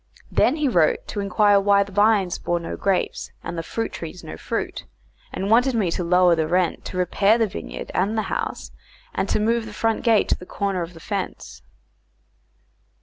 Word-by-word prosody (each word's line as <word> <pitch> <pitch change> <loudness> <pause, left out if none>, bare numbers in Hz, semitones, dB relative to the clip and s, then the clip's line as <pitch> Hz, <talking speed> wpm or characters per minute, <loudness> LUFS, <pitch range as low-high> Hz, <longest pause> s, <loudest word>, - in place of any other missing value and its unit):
Then 260 - +3
he 305 -2 0
wrote 170 -11 +2
to 205 - -4
inquire 200 +1 +3
why 200 0 +4
the 200 - -13
vines 205 -2 +2
bore 175 0 -1
no 165 - -5
grapes 195 -2 -1
and - - -5
the 165 - -2
fruit 225 +7 -4
trees 165 +1 -8
no 80 - -7
fruit, - - -4 0.5
and 195 +2 -3
wanted 250 +3 +4
me 195 -7 +1
to 180 - -2
lower 180 0 +4
the 160 -1 0
rent, 180 0 0
to 185 - -6
repair 200 +4 +3
the 230 - +3
vineyard 200 - -7
and 205 +4 0
the 220 - +1
house, - - -4 0.4
and 195 - -2
to - - +1
move 225 +1 +1
the 215 - -9
front 225 +1 0
gate 225 -4 +3
to - - +3
the 180 - -12
corner 195 -3 -2
of 170 +1 -6
the - - -11
fence. 195 +2 -5
200 Hz, 200 wpm, -23 LUFS, 180-220 Hz, 0.5 s, why